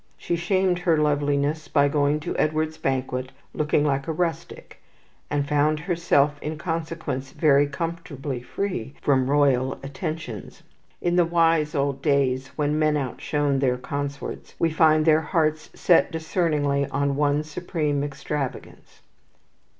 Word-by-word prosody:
She 170 - -2
shamed 180 +1 +1
her 170 -3 +2
loveliness 145 +1 0
by 145 -1 +3
going 145 +1 +1
to - - -4
Edward's 155 +1 0
banquet 130 -1 -2 0.2
looking 150 -1 +1
like 140 0 0
a - - 0
rustic, 165 0 -4 0.5
and 145 -1 -1
found 150 +1 +2
herself 150 -4 +1
in 155 +1 -4
consequence 160 -5 -4
very 145 -3 +4
comfortably 145 -3 -5
free 140 - -4
from 130 -2 +2
royal 135 -2 +3
attentions. 140 - -6 0.4
In 175 0 +1
the 175 - +5
wise 165 -2 +2
old 140 -1 0
days 135 -3 +1
when 150 0 0
men 155 -1 +2
outshone 140 +1 -1
their 125 -2 +1
consorts, 140 +2 -5
we 165 - +1
find 155 -1 +4
their 160 -1 +5
hearts 155 -1 0
set 175 0 +4
discerningly 155 -4 0
on 140 0 0
one 145 +1 +1
supreme 155 -2 -2
extravagance. 145 -1 -5
150 Hz, 135 wpm, -24 LUFS, 140-160 Hz, 0.5 s, the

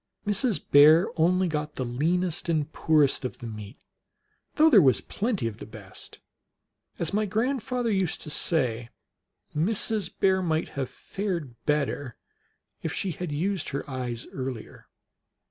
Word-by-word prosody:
Mrs. 210 +1 +1
Bear 155 +4 +7
only 180 +3 +3
got 150 -2 -3
the 130 - -2
leanest 170 +8 -1
and 155 -2 0
poorest 150 -5 +3
of 130 - -4
the 120 - -9
meat, 105 0 -8 0.8
though 310 +1 +6
there 235 -11 +7
was 130 - +4
plenty 205 - -2
of 110 -2 -4
the - - -8
best. - - -10 0.8
As 165 - -1
niy 210 0 0
grandfather 245 +2 -1
used 190 -4 0
to 150 - -5
say, 120 -9 0 0.7
Mrs. 215 +5 +1
Bear 190 -1 +3
might 160 -2 -1
have 135 -3 -4
fared 175 - -4
better 145 -3 -1 0.6
if 160 - -3
she 190 +2 -2
had 175 0 -5
used 180 +4 -1
her 140 - -4
eyes 125 -3 -4
earlier. 130 -4 -6
160 Hz, 145 wpm, -27 LUFS, 135-195 Hz, 0.8 s, Bear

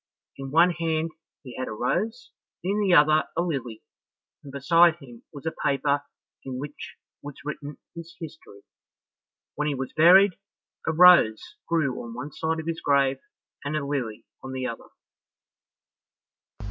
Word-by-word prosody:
In 135 0 -6
one 170 +5 +5
hand 165 -1 -2 0.3
he 125 -3 -10
had 130 - -3
a - - -5
rose, 165 - -2 0.3
in 200 +3 0
the 195 -2 +2
other 155 +1 +5
a - - +3
lily, 130 -10 -4 0.6
and 140 - -10
beside 165 +5 +4
him 125 -8 -14
was 145 0 -11
a 160 - -2
paper 140 0 +1 0.4
in 130 -1 -6
which 145 +2 -8 0.3
was 145 -1 -9
written 150 -1 -6 0.2
his 170 0 -10
history. 155 -11 -11 0.9
When 150 +1 -2
he 145 - -1
was 130 0 -5
buried, 180 +4 +6 0.5
a - - +3
rose 165 -10 +5 0.2
grew 155 -6 0
on 115 -1 -9
one 145 +4 -6
side 160 +3 -2
of 160 - -6
his 165 0 -3
grave, 135 -2 +2 0.4
and 145 +2 -2
a 140 - -3
lily 130 -7 -4 0.2
on 130 - -7
the 130 -1 -3
other. 115 -2 -6
145 Hz, 155 wpm, -25 LUFS, 135-165 Hz, 0.9 s, buried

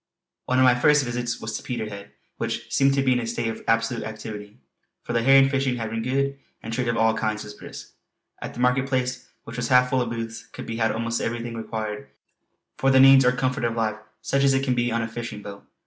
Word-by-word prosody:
One 125 - +1
of 130 - +5
my 125 - +6
first 145 +3 +3
visits 120 -1 -3
was 110 - -5
to - - -9
Peterhead 105 -5 -6 0.3
which - - -4
seemed 135 0 +3
to 135 - +2
be 130 -1 +3
in 125 - +1
a 115 - -4
state 115 0 -2
of 110 - -6
absolute 115 +1 +1
activity, 110 -1 -8 0.5
for - - -5
the 115 - +2
herring 135 +2 +6
fishing 135 -2 0
had 115 -2 -4
been 115 0 -2
good 140 +3 -1 0.2
and 115 - -5
trade 125 +1 -1
of 115 0 0
all 110 0 +3
kinds 110 -1 -2
was 105 0 -9
brisk. - - -11 0.5
At - - -7
the - - -8
market 125 +2 +2
place 130 -1 -2 0.2
which 115 +1 -9
was 120 -1 -1
half 125 0 +4
full 130 -1 +2
of 120 - -2
booths, 115 -1 -6
could - - -9
be 115 0 -5
had 110 -1 +2
almost 115 +1 -2
everything 120 0 -3
required 110 -1 -5 0.7
for 135 - +3
the 130 0 +5
needs 135 0 +8
or 125 - +4
comfort 130 +1 -1
of 115 -1 0
life 110 -2 -1 0.3
such 140 0 +1
as 135 -1 +4
it 135 - +1
can 130 -2 +1
be 120 0 0
on 115 0 0
a - - -2
fishing 115 -2 -7
boat. 100 -1 -10
120 Hz, 240 wpm, -24 LUFS, 115-130 Hz, 0.7 s, needs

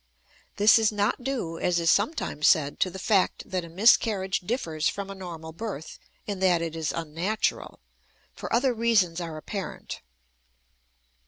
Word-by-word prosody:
This 210 +2 +6
is 220 -1 +3
not 210 +4 0
due, 235 -12 -3
as 175 -1 +1
is 165 -1 +3
sometimes 205 - +1
said, 145 -3 +3
to 185 - +2
the 185 - -8
fact 195 0 +1
that 185 -2 -2
a 170 - -9
miscarriage 195 0 +3
differs 170 - -1
from 200 0 -5
a - - -5
normal 170 -4 -8
birth 165 -4 -7 0.3
in 200 -2 -4
that 185 -2 +3
it 165 -1 -4
is 160 -2 -2
unnatural, 165 +6 -2 0.5
for - - -7
other 250 +2 +2
reasons 215 -7 +2
are 165 -2 -5
apparent. 195 +5 -6
185 Hz, 155 wpm, -26 LUFS, 165-215 Hz, 0.5 s, This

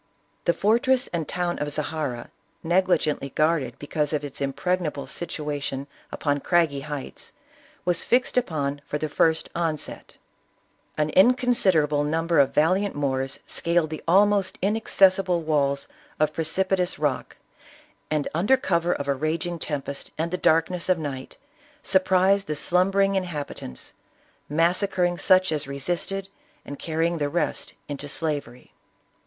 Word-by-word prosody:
The 170 - +4
fortress 245 +6 +2
and 165 -3 -2
town 175 -1 -2
of 145 0 -2
Zahara, 145 -5 -3 0.3
negligently 170 -5 +1
guarded 155 -4 0
because 150 +1 -2
of 150 -1 -1
its 140 0 -8
impregnable 150 +1 -1
situation 145 -4 -4 0.3
upon 145 -1 -1
craggy 165 -2 +2
heights, 145 -1 -7 0.5
was 175 -1 0
fixed 250 +1 +1
upon 145 - -1
for 150 - -2
the 155 - -2
first 160 +2 +2
onset. 165 -3 -3 0.8
An 155 0 +1
inconsiderable 190 - +3
num 160 +2 0
ber 165 -2 +3
of 140 - +4
valiant 185 +6 +2
Moors 135 -2 -1
scaled 170 -2 0
the 155 - -5
almost 200 +2 +3
inaccessible 195 -3 +3
walls 140 -3 0 0.3
of 155 0 +2
precipitous 180 +3 0
rock, 145 -3 -2 0.7
and, 155 -2 0
under 205 +12 +3
cover 175 -7 +1
of 140 - -4
a 140 - +3
raging 165 +4 -2
tempest 140 -2 -4
and 165 +2 -2
the - - 0
darkness 170 +1 +1
of 185 - +4
night, 140 -4 -6 0.5
surprised 190 +1 +3
the 150 - -2
slum 180 +5 +2
bering 195 0 +2
inhabitants, 150 - -5 0.6
massacring 175 +3 +1
such 185 -1 +4
as 150 -2 -2
resisted, 175 +7 -3 0.4
and 145 - -8
carrying 165 +1 -1
the 145 -1 0
rest 170 +3 -2
into 145 0 -4
slavery. 145 -5 -4
160 Hz, 135 wpm, -25 LUFS, 145-185 Hz, 0.8 s, The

